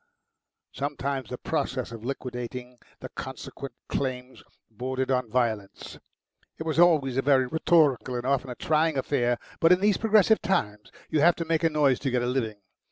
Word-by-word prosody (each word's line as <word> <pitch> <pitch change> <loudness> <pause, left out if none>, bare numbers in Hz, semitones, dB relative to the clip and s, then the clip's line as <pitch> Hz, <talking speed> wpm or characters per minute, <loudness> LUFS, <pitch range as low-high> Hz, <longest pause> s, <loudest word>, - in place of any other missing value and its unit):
Sometimes 140 -2 -3
the - - -5
process - - -2
of 115 -1 -9
liquidating 125 -1 -6 0.2
the - - -7
consequent 135 -3 -8
claims 130 -1 -4 0.3
bordered 130 +4 -3
on 125 -3 0
violence. 110 -4 -2 0.6
It - - -5
was 160 0 -1
always 150 -7 +4
a - - +3
very 135 -1 +3
rhetorical 145 -3 +2
and 120 0 -3
often 135 -1 0
a 125 - -5
trying 155 +2 +1
affair, 120 -3 +1 0.2
but 165 - +5
in 180 - +6
these 205 0 +3
progressive 220 -1 +4
times 105 - -1 0.2
you 155 - +2
have 170 +3 +5
to 165 - -4
make 165 0 0
a 165 - +4
noise 145 -4 +2
to 140 - -1
get 125 -1 0
a - - 0
living. 115 -5 -2
135 Hz, 170 wpm, -26 LUFS, 125-155 Hz, 0.6 s, in